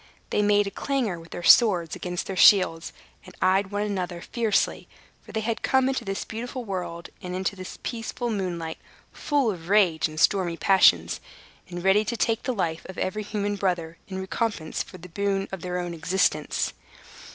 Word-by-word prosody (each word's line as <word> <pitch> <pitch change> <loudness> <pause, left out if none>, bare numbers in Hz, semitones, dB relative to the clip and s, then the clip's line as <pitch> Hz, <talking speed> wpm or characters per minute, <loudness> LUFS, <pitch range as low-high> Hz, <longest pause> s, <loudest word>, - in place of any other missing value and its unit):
They - - +2
made 205 0 +4
a 200 - -4
clangor 240 -8 -1
with 165 0 -14
their 175 - -7
swords 180 -7 +5
against 180 -1 -4
their 195 - -4
shields, 185 -4 +5 0.3
and 185 - -14
eyed 190 +1 +2
one 205 +1 -1
another 185 -4 -3
fiercely; 225 +2 0 0.3
for - - -13
they 220 - -2
had 225 +1 -2
come 265 -1 +3
into 265 0 -1
this 195 0 -3
beautiful 245 +2 -6
world, 180 -4 -5
and 180 0 -5
into 190 +2 -1
the 185 -1 -8 0.2
peaceful 235 +1 -3
moonlight, 175 -5 -3 0.3
full 285 -6 +1
of 170 -2 -9
rage 190 -7 +4
and 155 0 -7
stormy 175 -3 +2
passions, 195 +1 +4 0.5
and 175 -1 -6
ready 195 +2 +4
to 235 +2 -2
take 225 0 +1
the - - -2
life 170 -8 -2
of 190 - -8
every 200 +3 -2
human 205 -1 -2
brother, 175 -4 -2
in 190 - -6
recompense 190 -3 -2
of 185 -2 -12
the - - -8
boon 195 +2 -1
of 190 -3 -6
their 180 0 -3
own 175 -1 -3
existence. 175 +4 0
195 Hz, 185 wpm, -25 LUFS, 175-215 Hz, 0.5 s, swords